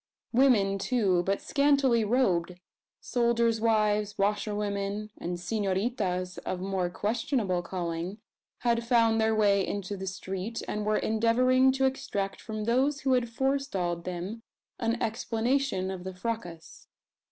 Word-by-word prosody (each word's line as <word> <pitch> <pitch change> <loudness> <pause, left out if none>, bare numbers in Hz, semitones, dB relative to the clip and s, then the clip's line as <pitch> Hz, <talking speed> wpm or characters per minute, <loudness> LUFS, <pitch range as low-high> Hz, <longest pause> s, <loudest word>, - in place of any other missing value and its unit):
Women, 220 -6 +4
too, 195 -5 +2
but 195 +3 -1
scantily 280 -5 +3
robed 185 -7 +1 0.4
soldiers' 235 -2 +1
wives, 210 -2 +2
washerwomen, 205 0 -1
and 175 0 -4
"senoritas" 190 -2 -1
of 185 - -4
more 190 -1 -1
questionable 210 -2 -1
calling 175 +1 -4 0.4
had 235 -1 +1
found 230 -2 +3
their 220 0 +2
way 200 -2 +3
into 200 0 -3
the 190 0 -6
street, 190 +4 -4
and 210 0 -3
were 215 - +3
endeavouring 255 +4 +3
to 270 0 +1
extract 200 -7 -2
from 215 -2 -5
those 265 +5 +1
who 265 -1 +2
had 245 -2 +1
forestalled 230 -10 -1
them 185 +5 -5 0.4
an 230 0 0
explanation 225 -2 0
of 185 -2 -6
the 190 0 -6
fracas. 180 -5 -6
215 Hz, 130 wpm, -28 LUFS, 190-235 Hz, 0.4 s, Women